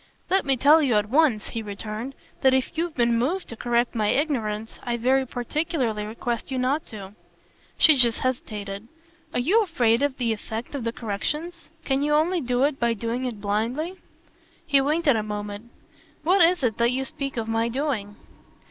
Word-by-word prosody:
"Let 385 -2 +3
me 270 -1 +2
tell 295 +6 +6
you 260 -7 +2
at 210 0 +1
once," 275 -7 +3
he 230 - -4
returned, 215 +5 -6 0.3
"that 265 -1 +5
if 260 +4 -1
you've 330 0 -2
been 235 -2 +2
moved 345 +10 -1
to 230 - -6
correct 240 +1 0
my 215 -2 0
ignorance 225 -6 -1
I 240 -1 -2
very 260 +3 +2
particularly 245 -4 -2
request 235 +1 -4
you 265 - -2
not 265 +5 0
to." 200 -3 -9 0.6
She 315 - +7
just 240 -3 +3
hesitated. 210 -5 -3 0.4
"Are - - -1
you 370 - +3
afraid 245 - +2
of 285 -1 0
the 235 -3 0
effect 220 +3 -6
of 270 -5 -4
the 230 - 0
corrections? 300 - -4 0.2
Can 270 0 +1
you 295 +1 +2
only 335 +3 +2
do 250 0 0
it 285 -1 +1
by 235 -1 +1
doing 235 +4 -3
it 235 -4 -4
blindly?" 230 - -1 0.7
He 280 -4 +4
waited 300 -1 +2
a 220 - +1
moment. 210 +1 -6 0.5
"What 365 +4 +4
is 345 -2 +4
it 225 -4 +1
that 235 0 +4
you 265 +1 -1
speak 275 -1 -5
of 225 -1 -2
my 225 +1 0
doing?" 235 -6 -2
245 Hz, 185 wpm, -25 LUFS, 225-290 Hz, 0.7 s, She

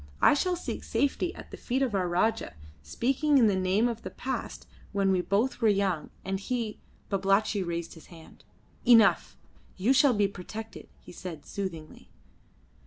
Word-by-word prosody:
I - - +6
shall 360 +6 +1
seek 350 - -5
safety 285 +5 0
at - - -11
the - - -8
feet 260 +2 -1
of 250 -5 -1
our 185 -2 +1
Rajah, 220 +6 0 0.3
speaking 270 - +1
in 245 - +6
the 205 -3 +3
name 190 +5 +2
of 230 -1 -4
the - - -6
past 265 +1 -5 0.3
when 195 -1 +2
we 185 -1 +2
both 220 +8 0
were 225 - +4
young, 195 -6 +1 0.2
and 190 0 -2
he 225 0 -3 0.2
" - - -34
Babalatchi 195 +1 +2
raised 170 -2 -4
his 160 - -15
hand. 165 -2 -15 0.4
"Enough. 230 -3 +5 0.4
You 210 +8 +3
shall 265 -2 +5
be 205 -1 +3
protected," 215 +4 -9
he - - -14
said 170 -4 -8
soothingly. 170 -6 -7
205 Hz, 175 wpm, -28 LUFS, 185-245 Hz, 0.4 s, I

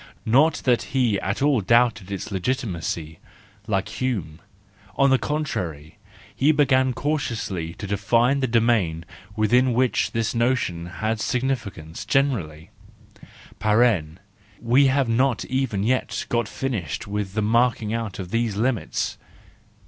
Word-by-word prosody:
Not 140 +8 +3
that 125 -2 +3 0.2
he 115 -6 +2
at 100 +7 -2
all 140 -6 +3
doubted 110 -1 +2
its 100 +2 -5
legitimacy, 90 - -3 0.5
like 95 -2 0
Hume: 95 -12 -3 0.6
on 140 -1 +4
the 130 - +4
contrary, 90 - -4 0.4
he 145 +3 +4
began 130 -3 +3
cautiously 115 - -3
to - - -7
define 115 +7 +2
the 130 - 0
domain 110 -9 +1 0.3
within 120 +4 +3
which 125 +1 +1
this 115 -1 -1
notion 115 -8 0
has 110 +4 -3
significance 115 -11 -3
generally 95 - -1 1.9
(we 125 +4 +4
have 135 -1 +2
not 120 0 +1
even 130 -7 -1
yet 130 +4 -1
got 120 -2 0
finished 105 - -4
with 100 -1 -4
the 110 - +1
marking 115 -1 +1
out 115 -4 -3
of 95 -2 -7
these 115 -3 0
limits). 115 +2 -1
115 Hz, 125 wpm, -23 LUFS, 95-130 Hz, 1.9 s, on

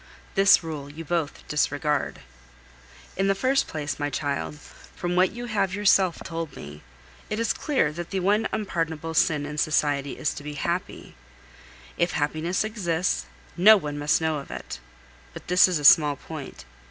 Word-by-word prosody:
This 195 -2 +5
rule 150 -3 -6
you 160 +3 -9
both 165 -2 -3
disregard. 150 0 -1 1.0
In 195 +1 +1
the 195 - +2
first 260 +6 +1
place, 145 -2 -4
my 145 0 -1
child, 145 0 -3 0.4
from 175 0 -2
what 185 +1 +4
you 240 +1 -7
have 200 -5 -1
yourself 195 -4 +3
told 165 -3 -5
me, 75 +1 -10 0.5
it 215 - -2
is 230 -2 +1
clear 270 - 0
that 170 +2 -7
the 195 - -2
one 205 +4 +2
unpardonable 165 -6 -3
sin 150 -2 +2
in 150 +1 -5
society 145 -2 0
is 150 - -1
to 145 - -9
be 150 0 -6
happy. 170 +5 -4 0.9
If 170 - +1
happiness 155 +5 -1
exists, 180 - -1 0.3
no 215 +5 +8
one 150 -5 -5
must 145 0 +2
know 160 -2 0
of 140 - -11
it. - - -7 0.6
But - - -9
this 180 +1 +6
is 180 -3 0
a 150 - -5
small 150 -2 +7
point. 150 0 -9
165 Hz, 165 wpm, -25 LUFS, 145-190 Hz, 1.0 s, no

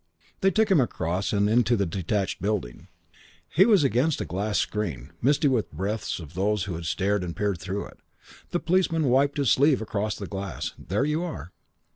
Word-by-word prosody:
They 195 - +4
took 220 +1 +2
him 170 -7 +6
across 90 -5 -1
and 100 -1 +2
into 120 +2 +3
the 100 - +1
detached 95 +3 -2
building. 90 - -3 0.6
He 190 +7 +4
was 205 -9 +5
against 135 +3 +2
a - - -2
glass 100 +6 -2
screen, 80 - -2
misty 145 +3 +3
with 125 -5 0
breaths 100 +8 -3
of 80 -4 -10
those 100 +2 0
who 100 -4 -4
had 85 +1 -6
stared 100 +5 0
and 85 -2 -5
peered 100 -4 -1
through 95 +3 -4
it. - - -14 0.5
The 175 - -1
policeman 170 -2 +1
wiped 140 +3 +3
his 140 -5 +2
sleeve 140 0 +4
across 105 -1 -2
the 100 - -6
glass. 95 0 -5
"There 105 - -1
you 150 +2 0
are." 160 - -6
105 Hz, 190 wpm, -26 LUFS, 95-140 Hz, 0.6 s, him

